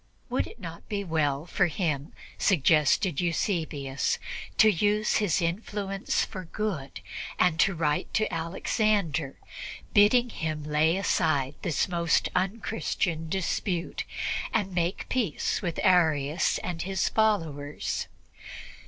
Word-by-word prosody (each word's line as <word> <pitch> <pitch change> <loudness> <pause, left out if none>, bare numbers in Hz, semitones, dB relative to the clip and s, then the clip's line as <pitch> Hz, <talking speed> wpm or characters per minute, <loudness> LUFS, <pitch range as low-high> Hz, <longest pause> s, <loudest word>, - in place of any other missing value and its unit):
Would 255 - 0
it - - -13
not 170 -4 -9
be 205 -1 -2
well 155 -4 0
for 180 +1 +2
him, 155 -4 -2 0.3
suggested 160 0 +3
Eusebius, 160 -6 -1 0.4
to 220 - +7
use 210 +2 +2
his 195 -4 +1
influence 195 +2 -1
for 185 -2 -7
good 165 -8 -4 0.4
and 170 -3 +3
to 195 - +4
write 150 -2 0
to 215 - +1
Alexander, 165 -3 0 0.6
bidding 235 +4 +5
him 155 -1 -3
lay 150 +3 +2
aside 155 -8 +1
this 170 -1 0
most 170 -2 +1
unchristian 185 -4 -1
dispute 180 -1 -1 0.5
and 200 -4 0
make 175 +1 -1
peace 230 -12 0
with 175 -5 -3
Arius 160 -5 +3
and 170 -2 -3
his 190 +1 0
followers? 160 -10 0
175 Hz, 115 wpm, -28 LUFS, 155-200 Hz, 0.6 s, to